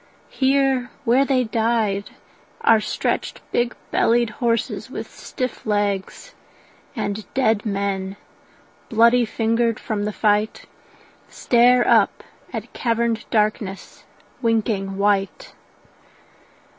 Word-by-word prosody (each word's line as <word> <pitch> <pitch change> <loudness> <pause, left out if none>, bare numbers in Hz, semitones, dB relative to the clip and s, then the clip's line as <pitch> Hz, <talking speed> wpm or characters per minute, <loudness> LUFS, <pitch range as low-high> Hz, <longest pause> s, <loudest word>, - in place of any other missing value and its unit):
Here 270 -2 +1 0.2
where 255 +4 +4
they 265 -2 +2
died 220 -3 0 0.5
Are 225 -1 +5
stretched - - -2
big 240 0 0 0.2
bellied 235 -1 +2
horses 230 -2 -1
with - - -6
stiff 255 -2 -6
legs; 205 - -2 0.6
And 210 -2 -4
dead 225 -5 +1
men, 195 -1 -2 0.7
bloody 235 +2 +4
fingered 230 +1 0
from 210 -3 -3
the 210 - -1
fight, 210 0 0 0.6
Stare 245 0 +3
up - - +3 0.3
at - - -6
caverned 230 -1 -1
darkness 210 -3 -2 0.4
winking 215 -4 0
white. 200 - 0
225 Hz, 95 wpm, -22 LUFS, 205-240 Hz, 0.7 s, Are